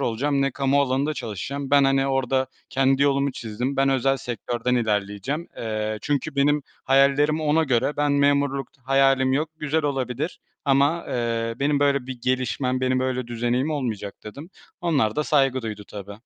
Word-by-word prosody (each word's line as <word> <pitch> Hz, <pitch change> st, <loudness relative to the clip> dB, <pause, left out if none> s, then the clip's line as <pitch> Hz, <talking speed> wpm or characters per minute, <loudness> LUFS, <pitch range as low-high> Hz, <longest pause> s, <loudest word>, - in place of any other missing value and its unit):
olacağım, 140 Hz, +3 st, 0 dB
ne 140 Hz, -, +1 dB
kamu 140 Hz, 0 st, +2 dB
alanında 140 Hz, +3 st, 0 dB
çalışacağım. 135 Hz, +7 st, -5 dB
Ben, 140 Hz, -1 st, +5 dB
hani, 135 Hz, 0 st, +2 dB
orada 135 Hz, -1 st, +1 dB, 0.2 s
kendi 135 Hz, +1 st, +2 dB
yolumu 140 Hz, -1 st, +2 dB
çizdim. 120 Hz, +4 st, -4 dB
Ben 135 Hz, 0 st, +3 dB
özel 135 Hz, 0 st, +2 dB
sektörden 120 Hz, +1 st, -2 dB
ilerleyeceğim. 110 Hz, -, -1 dB
Eee, 110 Hz, -1 st, -3 dB
çünkü 145 Hz, 0 st, -2 dB
benim 145 Hz, +1 st, +3 dB, 0.2 s
hayallerimi 140 Hz, +3 st, +3 dB
ona 155 Hz, +2 st, +2 dB
göre 130 Hz, +1 st, 0 dB
Ben 145 Hz, -1 st, +1 dB
memurluk 140 Hz, -1 st, +2 dB, 0.2 s
hayalim 135 Hz, -1 st, +3 dB
yok. 150 Hz, +3 st, 0 dB
Güzel 155 Hz, +1 st, 0 dB
olabilir 135 Hz, +3 st, -2 dB, 0.2 s
ama, 140 Hz, +4 st, +2 dB
eee, 115 Hz, -1 st, -1 dB
benim 145 Hz, 0 st, +1 dB
böyle 140 Hz, -3 st, +2 dB
bir 130 Hz, -2 st, -6 dB
gelişmem, 130 Hz, 0 st, 0 dB
benim 130 Hz, 0 st, +1 dB
böyle, 130 Hz, -1 st, -1 dB
düzeneğim 120 Hz, +5 st, -1 dB
olmayacak 115 Hz, -9 st, -3 dB
dedim. 140 Hz, -, -9 dB, 0.3 s
Onlar 140 Hz, -11 st, +1 dB
da 150 Hz, -, +1 dB
saygı 135 Hz, -4 st, +2 dB
duydu 105 Hz, -2 st, -6 dB
tabii. 100 Hz, 0 st, -8 dB
135 Hz, 160 wpm, -24 LUFS, 120-140 Hz, 0.3 s, Ben